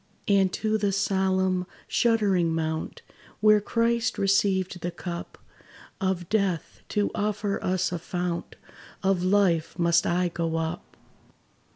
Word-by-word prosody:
And 195 -2 +3
to 220 0 0
the 200 -1 +1
solemn, 190 -1 +1 0.2
shuddering 195 -8 +2
mount, 160 0 -3 0.4
Where 215 0 +5
Christ 230 +2 0
received 195 -2 +1
the 175 - -2
cup 170 0 -7 0.6
Of 185 -2 -1
death, 195 -5 -1
to 205 -1 0
offer 210 -1 -2
us 185 0 0
a 175 - -3
fount 175 0 -4 0.5
Of 190 -2 +2
life, 185 -5 +2
must 170 -1 +3
I 175 +1 +1
go 165 -1 -2
up. 160 0 -4
190 Hz, 125 wpm, -26 LUFS, 175-205 Hz, 0.6 s, Where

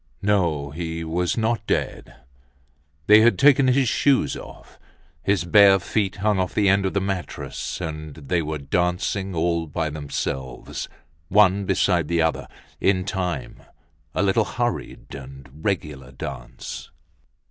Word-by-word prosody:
No, 85 -9 +1
he 80 +1 -4
was 85 +4 -1
not 115 0 0
dead. - - -2 0.9
They 105 +1 +7
had 115 -4 +4
taken 140 -1 +5
his 130 0 +3
shoes 135 +3 +2
off. - - -12 0.4
His 100 -1 +1
bare 100 +2 +6
feet 95 +1 -1
hung 105 0 +1
off 90 -1 -2
the 105 -2 +3
end 100 0 +3
of 95 - -5
the - - +3
mattress 95 -2 -4
and 75 -3 -6
they 80 +3 -1
were 80 0 -3
dancing 90 +6 -1
all 85 0 0
by 75 +1 -2
themselves, 65 -4 -5 0.4
one 100 0 +4
beside 90 -4 +2
the 85 +1 0
other, 80 - -1 0.3
in 95 -1 +2
time, 95 -3 -3 0.5
a - - +1
little 100 +3 +2
hurried 95 - -4
and 70 -1 -10 0.2
regular 75 -10 -3
dance. 65 -1 -7
90 Hz, 135 wpm, -23 LUFS, 80-100 Hz, 0.9 s, They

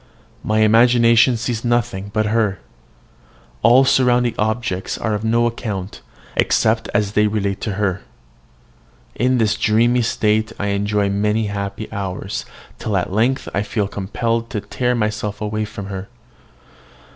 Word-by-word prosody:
My 110 0 +1
imagination 115 +2 +5
sees 115 0 -3
nothing 120 -5 -1
but 110 +1 0
her: 105 -3 +1 1.0
all 125 +4 +6
surrounding 125 -2 +3
objects 110 -3 -2
are 110 - -2
of 105 +1 -2
no 115 +1 +2
account, 105 -5 -4 0.3
except - - +1
as 105 -1 0
they 105 +1 +3
relate 100 -2 -2
to 105 - -2
her. 95 -2 -1 1.1
In 125 +2 +1
this 110 -3 +2
dreamy 115 +3 +2
state 110 -1 +1
I 100 - -1
enjoy 100 0 0
many 105 +2 +1
happy 100 +1 -4
hours, 95 -1 -4 0.3
till 105 -3 -1
at 90 +1 -2
length 120 +6 +1
I 100 - +1
feel 105 -1 -1
compelled 115 +4 -2
to 110 -5 -3
tear 125 +4 -1
myself 105 -2 -2
away 105 0 -2
from 105 -1 -8
her. 95 0 -6
110 Hz, 140 wpm, -19 LUFS, 100-115 Hz, 1.1 s, all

